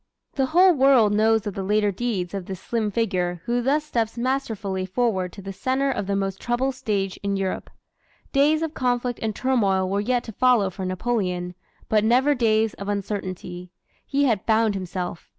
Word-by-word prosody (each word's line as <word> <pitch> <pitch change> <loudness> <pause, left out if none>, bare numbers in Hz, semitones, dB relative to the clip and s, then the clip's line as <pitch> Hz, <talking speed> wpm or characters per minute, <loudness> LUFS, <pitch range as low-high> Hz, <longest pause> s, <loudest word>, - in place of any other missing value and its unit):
The 270 -2 +1
whole 360 +5 +5
world 260 -7 +5
knows 220 0 +3
of 205 - -3
the 195 - -4
later 210 +1 +2
deeds 195 -4 -3
of 195 -3 -5
this 190 -2 -6
slim 225 -1 -1
figure 185 -5 -1
who 240 0 0
thus 285 +5 +1
steps 230 -6 -2
masterfully 225 -7 -2
forward 190 -2 -1
to 200 - -10
the 195 0 -6
center 265 +6 0
of 200 - -3
the 200 - 0
most 195 -1 -2
troubled 255 +3 0
stage 205 -7 -2
in 200 -1 -1
Europe. 190 -1 -3 0.6
Days 305 +3 +3
of 320 -1 -3
conflict 245 -3 -1
and 220 -2 -2
turmoil 200 -8 +1
were 200 +2 0
yet 245 +3 0
to 225 - -8
follow 235 -4 +3
for 190 +1 -5
Napoleon, 185 -3 -2 0.3
but 215 -1 +2
never 255 +6 +4
days 220 -4 +2
of 200 +1 -7
uncertainty. 185 -3 -4 0.3
He 280 0 0
had 225 -7 +1
found 220 -1 +3
himself. 180 -2 -5
215 Hz, 185 wpm, -24 LUFS, 195-250 Hz, 0.6 s, whole